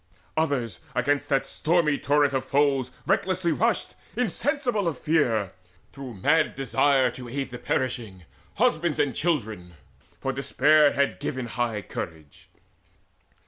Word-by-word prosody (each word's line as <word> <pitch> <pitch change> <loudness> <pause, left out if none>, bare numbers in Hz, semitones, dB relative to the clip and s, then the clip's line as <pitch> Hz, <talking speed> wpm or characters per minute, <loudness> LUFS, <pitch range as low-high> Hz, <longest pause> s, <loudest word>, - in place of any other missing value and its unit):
Others 130 - -1 0.2
against 140 +3 0
that 135 -1 +2
stormy 155 -3 +1
torrent 145 -1 +2
of 135 -1 0
foes 140 -3 +1 0.2
Recklessly 185 -2 +1
rushed, 225 +8 0 0.2
insensible 245 - 0
of 155 -6 -1
fear, 120 - +1 0.4
Through 135 -4 -8
mad 155 +11 +2
desire 135 -1 +2
to 125 0 -9
aid 135 +1 -4
the 120 - -7
perishing, 120 -9 -2 0.3
Husbands 155 -1 +1
or 140 - +2
children; 110 - -2 0.4
for - - -2
despair 150 +1 +4
had 140 0 0
given 130 -1 -3
High 115 -3 -2
courage. 80 -4 -8
140 Hz, 125 wpm, -26 LUFS, 120-155 Hz, 0.4 s, despair